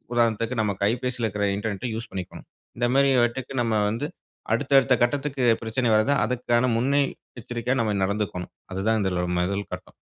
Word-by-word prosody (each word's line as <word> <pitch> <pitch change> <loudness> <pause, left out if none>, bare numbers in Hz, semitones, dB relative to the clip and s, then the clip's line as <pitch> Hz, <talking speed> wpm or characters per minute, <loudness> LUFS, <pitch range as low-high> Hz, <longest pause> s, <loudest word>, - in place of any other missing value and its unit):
உதாரணத்துக்கு 115 0 +1
நம்ம 105 -2 0
கைபேசில 125 +2 0
இருக்குற 100 0 -1
இன்டர்நெட், 105 +3 -3
யூஸ் 115 - -6
பண்ணிக்கணும். 95 -2 -7 0.3
இந்த 120 0 +2
மாதிரி 140 0 +5
வட்டுக்கு 130 +2 -5
நம்ப 115 -2 0
வந்து, 115 +7 -2 0.5
அடுத்த 135 +4 0
அடுத்த 135 - +2
கட்டத்துக்கு 140 +1 -1 0.2
பிரச்சனை 115 +3 -1
வருது, 110 +6 +3
அதுக்கான 125 0 +1
முன்னெ 135 +4 +2 0.4
எச்சரிக்கையா 120 +2 -2
நம்ப 110 -2 0
நடந்துக்கணும். 100 -2 -2 0.2
அதுதான் 105 +4 +1
இதுல 90 -2 0
முதல் 100 +3 -1
கட்டம். 90 - -8
115 Hz, 155 wpm, -25 LUFS, 105-125 Hz, 0.5 s, மாதிரி